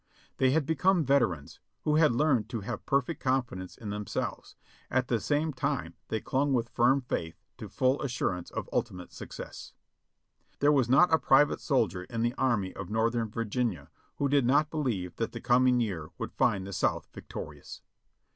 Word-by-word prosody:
They 130 - +4
had 145 +2 +2
become 165 +2 +2
veterans, 120 - +1 0.2
who 150 0 +2
had 155 -3 +5
learned 125 -3 +2
to 115 -3 -4
have 100 - -6
perfect 140 +2 0
confidence 120 -9 -2
in 105 -3 -6
themselves, 105 -1 -4 0.3
at 130 0 0
the 115 - +2
same 150 +4 0
time 130 - -2
they 110 - -1
clung 140 +4 0
with 120 -2 0
firm 130 +4 +3
faith 85 -9 -4 0.2
to - - -7
full 130 +2 +1
assurance 95 -10 -2
of - - -5
ultimate 90 -1 -3
success. - - -9 0.8
There 145 +1 +4
was 135 -5 +2
not 160 +6 +5
a 160 - +5
private 145 +2 +4
soldier 100 - 0
in 115 +2 -3
the 120 +1 +1
Army 110 -9 0
of 95 -1 -6
North 110 +2 +1
ern 115 -2 -1
Virginia 110 - -2 0.2
who 140 - 0
did 140 -3 +3
not 145 +3 +3
believe 110 - -2
that 115 - -2
the 115 - -5
coming 125 +1 +3
year 90 -9 -2
would - - -5
find 95 -2 +1
the 100 - -7
South - - 0
victorious. - - -9
125 Hz, 175 wpm, -29 LUFS, 105-140 Hz, 0.8 s, had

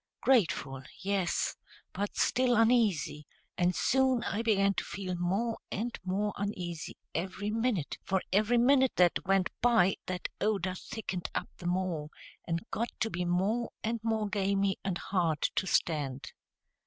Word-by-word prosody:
Grateful, 160 - +2 0.2
yes, 190 -2 0 0.4
but 200 +2 -3
still 250 -1 +3
uneasy; 210 - +2 0.3
and 180 0 +2
soon 260 -2 +2
I 205 - -1
began 200 -3 +3
to - - -2
feel 185 -1 -4
more 195 +7 -1
and 235 +4 -2
more 200 +3 -1
uneasy 180 -5 -4 0.2
every 190 +4 -2
minute, 225 - -1
for 190 -1 0
every 215 +4 +3
minute 265 +2 +4
that 180 -1 +3
went 195 -1 +3
by 225 -6 +4
that 185 0 -3
odor 195 -3 +1
thickened 185 -1 -5
up - - -2
the 175 - -6
more, 175 -4 -1 0.4
and 165 +3 -2
got 235 +2 -1
to 225 - +1
be 175 +1 -2
more 200 +7 +1
and 230 +1 -1
more 220 -2 0
gamey 200 -1 +1
and 190 -3 -1
hard 170 -6 0
to 190 - 0
stand. 140 -7 0
195 Hz, 145 wpm, -31 LUFS, 175-225 Hz, 0.4 s, minute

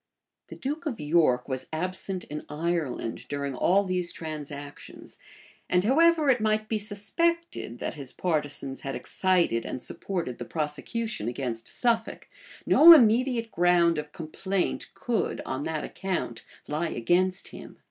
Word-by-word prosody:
The - - -9
duke 305 +5 -4
of 245 -7 -3
York 150 -5 +2
was 130 -2 -4
absent 185 +3 -3
in 150 0 -7
Ireland 150 -7 -2
during 140 -1 -3
all 185 +10 +3
these 180 -2 -1
transactions 145 -2 -8 0.5
and 180 0 +3
however 315 +6 +4
it 245 -3 +1
might 215 0 +1
be 220 -1 -1
suspected 220 - -1
that - - -4
his 140 -3 -9
partisans 145 -5 -2
had 135 - -4
excited 175 -11 +1
and - - -5
supported 165 0 -4
the 120 - -5
prosecution 155 - -3
against 120 -2 -4
Suffolk, 230 -2 -1 0.4
no 335 +2 +10
immediate 235 -3 +4
ground 170 -2 +3
of 150 0 -7
complaint 185 +4 -3
could, 240 -3 -1
on 130 +2 -3
that 160 -2 -2
account, 180 -11 -4 0.2
lie 155 +3 -1
against 185 +10 +1
him. - - -11
175 Hz, 135 wpm, -27 LUFS, 145-215 Hz, 0.5 s, no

